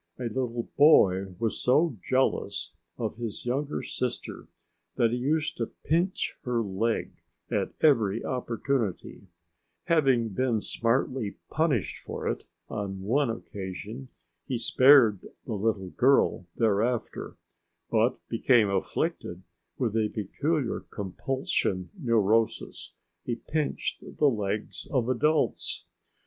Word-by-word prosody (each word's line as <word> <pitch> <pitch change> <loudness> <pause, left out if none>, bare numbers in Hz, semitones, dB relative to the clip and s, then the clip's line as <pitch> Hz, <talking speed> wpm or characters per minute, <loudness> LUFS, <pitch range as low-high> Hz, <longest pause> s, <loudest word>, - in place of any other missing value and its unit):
A 125 - -6
little 120 0 -2
boy 95 - +5
was 115 +2 -2
so 150 +3 +3
jealous 130 +1 0 0.2
of - - -3
his 115 -2 -5
younger 140 +4 -1
sister 125 -1 -4 0.5
that 115 -1 +3
he 120 - 0
used 150 +5 0
to 115 - -1 0.2
pinch 170 +5 0
her 120 -2 0
leg 110 +3 -2 0.3
at - - -1
every 115 -8 +3
opportunity; 120 -5 -2 0.6
having 135 -8 +3
been 120 +2 0
smartly 115 0 -1 0.2
punished 155 - 0
for - - -5
it - - -2 0.2
on 100 -2 -4
one 125 +7 +1
occasion 110 +3 -6 0.4
he 130 - -1
spared 125 -4 +6 0.2
the 115 - -4
little 100 -3 -1
girl 130 -9 +3
thereafter, 115 +2 0 0.5
but - - +3
became 115 -6 +3
afflicted 95 -1 -2 0.3
with 115 -4 -1
a 110 -1 +2
peculiar 140 - -1
compulsion 100 -2 -2
neurosis: 115 - 0 0.3
he 120 - -2
pinched 150 +5 -3
the 150 - +3
legs 105 -2 -3
of 125 -4 +1
adults. 150 +5 +1
120 Hz, 110 wpm, -28 LUFS, 105-135 Hz, 0.6 s, spared